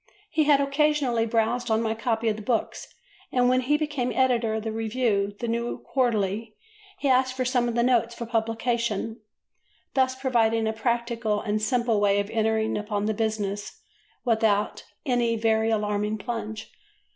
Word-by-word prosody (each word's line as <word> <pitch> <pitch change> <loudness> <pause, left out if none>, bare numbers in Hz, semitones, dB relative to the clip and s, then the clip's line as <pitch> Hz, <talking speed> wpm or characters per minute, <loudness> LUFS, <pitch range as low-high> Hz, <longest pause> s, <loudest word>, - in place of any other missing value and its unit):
He 310 -1 +2
had 285 -2 +5
occasionally 275 -4 +1
browsed 230 +2 0
on 220 0 +3
my 225 -1 0
copy 225 0 -1
of 215 - +2
the 215 - -8
books, 225 +1 -2 0.4
and 250 -1 +3
when 255 0 +3
he 290 +4 +2
became 295 -5 -2
editor 240 -4 +2
of 220 0 -4
a 220 - -1
review, 220 -3 0
the 235 - -3
New 235 +1 -2 0.2
Quarterly, 220 -4 0 0.4
he 295 - -2
asked 260 0 +2
for 255 - 0
some 250 -1 +1
of 230 - -3
the 235 - +2
notes 235 -1 +2
for 235 - -5
publication, 225 -1 -1 0.7
thus 260 -1 +2
providing 230 -4 +1
a 220 - 0
practical 235 -1 -1
and 215 0 -1
simple 230 -1 +1
way 200 0 +3
of 200 +1 -3
entering 220 -1 +1
upon 210 -1 -2
the 220 - +1
business 205 -2 -3 0.5
without 220 -3 +1 0.2
any 240 -3 +1
very 220 0 +2
alarming 210 0 0
plunge. 220 -1 -5
230 Hz, 165 wpm, -26 LUFS, 220-245 Hz, 0.7 s, had